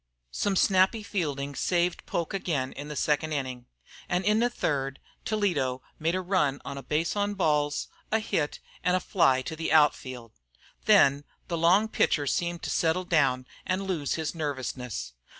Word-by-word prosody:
Some 200 - 0
snappy 190 +4 +3
fielding 145 -8 -2
saved 175 +4 0
Poke 170 +1 -2
again 150 -9 -1
in 145 +1 -7
the 150 - -6
second 150 +2 0
inning, 130 -4 -4 0.4
and 180 +1 0
in 210 +1 +3
the 240 +1 +3
third 135 - -2 0.3
Toledo 150 -13 0 0.2
made 165 +3 +1
a 185 - 0
run 175 -7 +1
on 140 - -5
a 140 - -6
base 155 +6 -1
on 205 0 0
balls, 150 -5 +1 0.2
a 220 - +4
hit 160 -8 -1 0.2
and 180 0 +3
a - - +2
fly 135 -9 +2
to 160 - -5
the 160 -1 -3
out 155 -2 +6
field. 125 -3 -9 0.5
Then 140 +1 +5 0.3
the 170 - -1
long 185 +6 +4
pitcher 150 -8 +1
seemed 170 +4 -1
to - - -2
settle 170 +2 +1
down 135 -7 +2 0.2
and 185 +1 -1
lose 165 -7 -1
his 160 -2 -2
nervousness. 130 - -4
155 Hz, 170 wpm, -28 LUFS, 140-185 Hz, 0.5 s, out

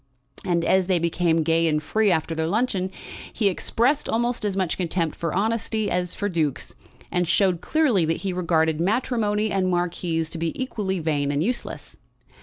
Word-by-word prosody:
And 170 -3 0
as 190 -1 +3
they 185 -2 +3
became 165 -1 +1
gay 165 +1 +2
and 155 -1 +2
free 210 +8 +1
after 165 -2 +1
their 160 0 -1
luncheon 195 -1 0 0.4
he 210 -3 +1
expressed 240 - 0
almost 240 +1 0
as 200 -2 -1
much 185 -4 0
contempt 170 -3 -1
for 165 -2 -3
honesty 220 +2 -1
as 180 -1 -1
for 205 - -2
dukes, 160 -7 -2 0.4
and 180 -1 0
showed 185 -2 +2
clearly 280 - +2
that 165 +1 0
he 190 - -1
regarded 160 -3 +1
matrimony 215 0 0
and 190 -1 +1
marquises 175 -2 -1
to 165 - -5
be 165 0 -3
equally 210 -7 -2
vain 150 -4 0
and 145 +2 0
useless. 240 +5 -4
180 Hz, 175 wpm, -24 LUFS, 165-210 Hz, 0.4 s, as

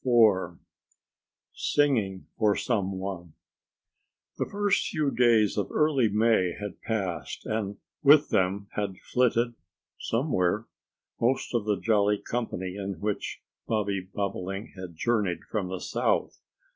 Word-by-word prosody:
IV 105 -9 +4 1.0
SINGING 115 -11 +1
FOR 105 -2 +3
SOME 100 -6 0
ONE 95 -4 -5 1.1
THE - - 0
first 205 -1 +1
few 150 -4 0
days 115 -4 +4
of 100 - -2
early 145 -7 +3
May 105 -4 +3
had 105 -2 -6
passed 100 -6 -3
and 105 -2 -2 0.2
with 145 +1 +6
them 95 +2 +1
had 100 -3 -3
flitted 120 -1 +1 0.5
somewhere 115 - 0 0.5
most 125 +3 +1
of 115 -4 0
the 105 -3 +1
jolly 105 -1 +3
company 100 -6 -4
in 95 -3 -4
which 105 +1 -3 0.2
Bobby 100 -3 0
Bobolink 95 +1 -3
had 90 -3 -8
journeyed 105 -2 0
from 105 -4 -1
the 95 0 -4
South. - - -1
105 Hz, 120 wpm, -28 LUFS, 95-120 Hz, 1.1 s, with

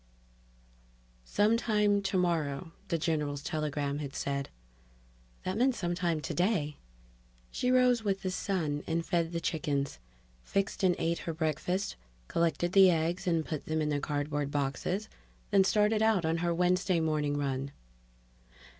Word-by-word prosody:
Sometime 210 - +2
tomorrow, 170 -5 0 0.2
the 165 - 0
general's 150 -3 -1
telegram 145 -2 -2
had 140 -2 -6
said 140 0 -2 0.9
That 190 +4 -2
meant 255 0 +3
sometime 175 -3 -1
today! 165 - 0 0.7
She 250 - -1
rose 250 -2 +4
with 195 -2 -1
the 185 - -1
sun 160 -7 -1
and 165 0 -1
fed 170 -2 0
the 170 - -2
chickens, 145 -4 -2 0.4
fixed 195 - -1
and 180 -2 +4
ate 165 0 0
her 165 - -4
breakfast, 160 +5 -1 0.3
collected 170 +1 0
the 195 -1 +8
eggs 170 +2 0
and 165 -3 +1
put 155 -3 -5
them 160 0 0
in 150 -1 0
their 145 -1 0
cardboard 145 0 -2
boxes, 145 - -2 0.4
then 195 -1 +6
started 210 +2 +3
out 220 -6 +3
on 160 +1 +1
her 170 0 0
Wednesday 180 +1 +2
morning 150 -2 0
run. 140 -1 -2
165 Hz, 135 wpm, -31 LUFS, 150-190 Hz, 0.9 s, the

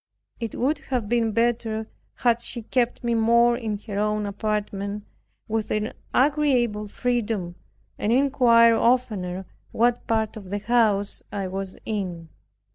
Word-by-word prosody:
It 230 -3 -4
would 285 +4 0
have 250 -7 -3
been 230 0 +1
better 225 -1 0 0.3
had 235 -1 +2
she 235 -1 -6
kept 245 +2 0
me 235 0 +1
more 235 +1 +4
in 220 -4 -3
her 205 -3 -3
own 210 0 0
apartment, 205 0 -3 0.4
with 220 -1 -2
an 215 0 -1 0.2
agreeable 255 -7 +2
freedom 225 -6 -1 0.5
and 210 - 0
inquired 235 -3 +5
oftener 200 -7 +1 0.3
what 240 +1 +1
part 220 -1 0
of 195 -4 -10
the 205 - -1
house 210 -2 +1
I 195 -2 -3
was 190 0 -5
in. 180 -6 -4
225 Hz, 135 wpm, -24 LUFS, 205-240 Hz, 0.5 s, inquired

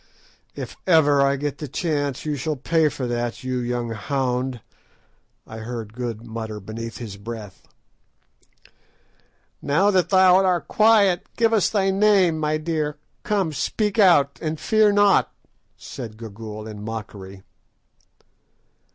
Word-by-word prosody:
"If - - -7
ever 145 -5 +5
I 140 0 +3
get 145 0 -4
the 150 - -5
chance 145 -2 -2
you 150 -1 -1
shall 150 +3 -2
pay 160 +3 +1
for 140 -2 -5
that, 120 0 -3
you 130 -1 -2
young 120 -1 -3
hound!" 125 +2 -2 0.9
I 110 - -9
heard 110 -1 -6
Good 120 -2 -5
mutter 110 -2 -6
beneath 115 +3 -7
his 105 -5 -8
breath. 105 -2 -9 1.9
"Now 185 +9 +2
that 180 -3 +2
thou 185 -1 +5
art 180 -5 +1
quiet, 210 -5 +3
give 230 -1 +3
us 215 -4 +3
thy 195 -2 +1
name, 190 -5 +3
my 155 0 0
dear. 155 -2 -2 0.2
Come, 195 -7 -1
speak 210 +8 -1
out, 145 -8 +4
and 155 -1 -3
fear 215 -1 +3
not," 205 -1 +3 0.5
said 115 -4 -8
Gagool 110 -1 -8
in 105 -1 -8
mockery. 100 -3 -8
140 Hz, 135 wpm, -23 LUFS, 115-180 Hz, 1.9 s, ever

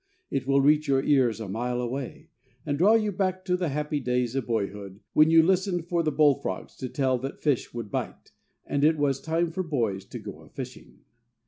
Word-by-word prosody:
It 135 -1 -2
will 140 0 +4
reach 150 +2 +3
your 135 -1 +2
ears 130 -7 +3
a 110 - -5
mile 120 +5 -2
away, 125 +2 -5 0.4
and 145 -2 0
draw 195 +9 +5
you 215 -2 +1
back 185 -1 -2
to 180 -1 +1
the 180 -3 -1
happy 150 +1 -2
days 125 -2 -1
of 135 -3 -2
boyhood, 100 -3 -3
when 155 +1 +6
you 165 0 +7
listened 185 -1 +1
for 170 0 0
the 155 -2 0
bullfrogs 140 -11 +1
to 130 - -5
tell 130 -2 0
that 135 +2 -6
fish 145 -5 +1
would 115 -4 -6
bite, - - -5 0.3
and 140 - -1
it 155 +1 +4
was 140 -2 0
time 165 +1 0
for 185 +3 -2
boys 115 - -1
to - - -8
go - - -9
a - - -17
fishing. - - -9
140 Hz, 210 wpm, -26 LUFS, 125-165 Hz, 0.4 s, you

